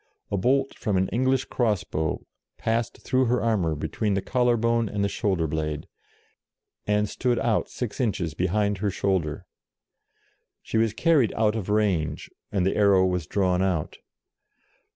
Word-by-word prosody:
A -, -, +1 dB
bolt 135 Hz, +7 st, +1 dB
from 105 Hz, -5 st, 0 dB
an 95 Hz, 0 st, +2 dB
English 130 Hz, +4 st, +1 dB
cross 110 Hz, -6 st, 0 dB
bow 80 Hz, 0 st, -3 dB, 0.3 s
passed 115 Hz, 0 st, -2 dB
through 130 Hz, 0 st, +2 dB
her 125 Hz, +1 st, +2 dB
armour 95 Hz, -9 st, +1 dB
between 80 Hz, +8 st, -1 dB
the 100 Hz, -, 0 dB
collar 125 Hz, 0 st, +2 dB
bone 115 Hz, -1 st, +1 dB
and 100 Hz, 0 st, -1 dB
the -, -, +2 dB
shoulder 95 Hz, -3 st, 0 dB
blade, 75 Hz, -1 st, -3 dB, 1.0 s
and 105 Hz, 0 st, +2 dB
stood 120 Hz, +3 st, 0 dB
out 115 Hz, -5 st, 0 dB
six 120 Hz, -5 st, -5 dB
inches 95 Hz, -, -1 dB
behind 100 Hz, +4 st, 0 dB
her 105 Hz, +1 st, 0 dB
shoulder. 95 Hz, -6 st, -1 dB, 1.2 s
She 110 Hz, -, -1 dB
was 110 Hz, -1 st, +2 dB
carried 155 Hz, -8 st, +3 dB
out 110 Hz, -1 st, +2 dB
of 105 Hz, -3 st, -4 dB
range, 100 Hz, -8 st, 0 dB, 0.2 s
and 95 Hz, -4 st, +1 dB
the 95 Hz, -, +1 dB
arrow 100 Hz, -3 st, +5 dB
was 90 Hz, -4 st, -1 dB
drawn 90 Hz, -2 st, +1 dB
out. 90 Hz, -5 st, -1 dB
105 Hz, 155 wpm, -25 LUFS, 90-115 Hz, 1.2 s, arrow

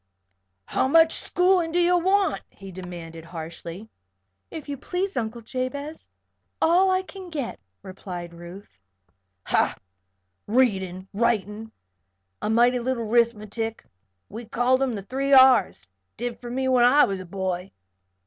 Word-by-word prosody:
"How -, -, 0 dB
much 325 Hz, +3 st, +5 dB
schoolin' 360 Hz, -2 st, +1 dB
do 350 Hz, -, +1 dB
you 350 Hz, +1 st, +4 dB
want?" 385 Hz, +3 st, +1 dB
he 195 Hz, -1 st, -12 dB
demanded, 175 Hz, -3 st, -9 dB
harshly. 170 Hz, +4 st, -8 dB, 0.6 s
"If 315 Hz, -, -8 dB
you 285 Hz, -, -3 dB
please 370 Hz, +8 st, -3 dB
Uncle 230 Hz, 0 st, -3 dB
Jabez, 275 Hz, +6 st, -5 dB, 0.5 s
all 360 Hz, +4 st, +4 dB
I 375 Hz, 0 st, +1 dB
can 375 Hz, -1 st, -10 dB
get," 285 Hz, -7 st, -4 dB, 0.2 s
replied 180 Hz, -3 st, -8 dB
Ruth. 175 Hz, -, -12 dB, 0.6 s
"Ha! -, -, +1 dB, 0.7 s
Readin', 195 Hz, -6 st, +1 dB
writin', 220 Hz, 0 st, -1 dB, 0.7 s
an' 220 Hz, +1 st, 0 dB
mighty 245 Hz, +1 st, +4 dB
little 240 Hz, -1 st, -2 dB
'rithmatic 225 Hz, -1 st, 0 dB, 0.4 s
we 230 Hz, +3 st, -8 dB
called 245 Hz, +4 st, +1 dB
'em 260 Hz, -4 st, 0 dB
'the 200 Hz, -, -6 dB
three 270 Hz, +6 st, -1 dB
R's 255 Hz, -, +5 dB, 0.2 s
' 95 Hz, -, -52 dB
did 240 Hz, +1 st, -4 dB
for 240 Hz, -, -7 dB
me 260 Hz, +2 st, -1 dB
when 255 Hz, -2 st, +4 dB
I 280 Hz, +5 st, +6 dB
was 195 Hz, -1 st, -3 dB
a 185 Hz, -, -8 dB
boy. 185 Hz, 0 st, -3 dB
235 Hz, 140 wpm, -25 LUFS, 195-275 Hz, 0.7 s, I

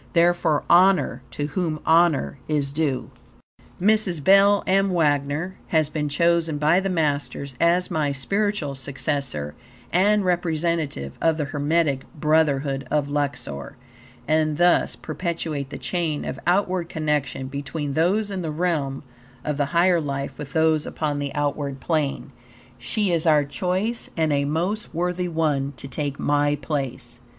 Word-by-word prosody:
Therefore, 170 Hz, -3 st, +3 dB
honor 180 Hz, -8 st, +4 dB
to 145 Hz, +5 st, -3 dB
whom 160 Hz, 0 st, -2 dB
honor 165 Hz, -4 st, +3 dB
is 145 Hz, -3 st, -1 dB
due. 145 Hz, -4 st, -1 dB, 0.7 s
Mrs. 195 Hz, -5 st, +2 dB
Belle 200 Hz, +3 st, +5 dB
M. 195 Hz, +1 st, +3 dB
Wagner 150 Hz, +1 st, 0 dB
has 155 Hz, -3 st, +2 dB
been 150 Hz, -1 st, -2 dB
chosen 170 Hz, 0 st, +2 dB
by 155 Hz, +4 st, +3 dB
the 195 Hz, 0 st, -2 dB
Masters 145 Hz, -4 st, -1 dB
as 175 Hz, +2 st, +3 dB
my 150 Hz, -2 st, 0 dB
spiritual 195 Hz, +2 st, -1 dB
successor 135 Hz, -, -3 dB, 0.4 s
and 200 Hz, +3 st, +3 dB
representative 165 Hz, -, -1 dB
of 165 Hz, -1 st, +2 dB
the 150 Hz, -, -1 dB
Hermetic 145 Hz, -1 st, 0 dB
Brotherhood 145 Hz, -3 st, +1 dB
of 145 Hz, -2 st, 0 dB
Luxor, 140 Hz, -, -3 dB, 0.5 s
and 155 Hz, -1 st, +1 dB
thus 175 Hz, +1 st, +3 dB
perpetuate 155 Hz, -3 st, -4 dB
the -, -, -6 dB
chain 165 Hz, -5 st, -2 dB
of 135 Hz, -, -5 dB
outward 180 Hz, -2 st, +1 dB
connection 150 Hz, -4 st, -1 dB
between 140 Hz, +1 st, -4 dB
those 195 Hz, +7 st, +1 dB
in 190 Hz, -2 st, -3 dB
the 165 Hz, -, -3 dB
realm 150 Hz, -4 st, -1 dB, 0.4 s
of 150 Hz, -1 st, -1 dB
the 145 Hz, -, +1 dB
higher 170 Hz, +3 st, +3 dB
life 140 Hz, -2 st, -4 dB
with 140 Hz, -2 st, -7 dB
those 160 Hz, -1 st, +2 dB
upon 150 Hz, -2 st, -2 dB
the 140 Hz, -1 st, -3 dB
outward 145 Hz, -1 st, -2 dB
plane. 150 Hz, -3 st, -1 dB, 0.5 s
She 200 Hz, -, -1 dB
is 165 Hz, 0 st, +1 dB
our 150 Hz, -2 st, +5 dB
choice, 185 Hz, +10 st, -2 dB
and 160 Hz, -2 st, +2 dB
a 140 Hz, 0 st, +1 dB
most 175 Hz, +9 st, -2 dB
worthy 180 Hz, +1 st, -1 dB
one 150 Hz, -4 st, 0 dB
to 135 Hz, -, -7 dB
take 140 Hz, 0 st, -3 dB
my 145 Hz, 0 st, +1 dB
place. 135 Hz, -4 st, -4 dB
155 Hz, 140 wpm, -23 LUFS, 140-175 Hz, 0.7 s, Belle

